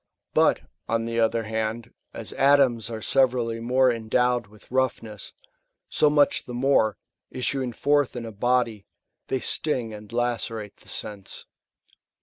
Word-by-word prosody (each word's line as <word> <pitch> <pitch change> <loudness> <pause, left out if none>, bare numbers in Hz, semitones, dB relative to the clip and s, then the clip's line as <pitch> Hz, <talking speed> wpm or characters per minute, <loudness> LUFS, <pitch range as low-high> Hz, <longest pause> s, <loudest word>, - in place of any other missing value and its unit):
But, - - +4 0.3
on 115 0 +1
the 115 0 -1
other 115 0 +2
hand, 110 +1 -3 0.2
as - - -6
atoms 135 -5 +4
are 110 -2 -6
severally 125 -4 +2
more 125 +2 +3
endowed 120 +1 +1
with 105 +2 -20
roughness, 120 -5 -2 0.6
so 150 - +3
much 145 -1 +3
the 125 - -7
more, 120 -5 +2 0.3
issuing 130 0 -2
forth 145 +3 +1
in 120 -1 -4
a 115 - -6
body,^ 115 -1 0 0.4
they 130 - 0
sting 125 -8 -1
and 105 -1 -10
lacerate 115 -3 -2
the - - -14
sense. 100 -2 -6
120 Hz, 135 wpm, -25 LUFS, 110-130 Hz, 0.6 s, But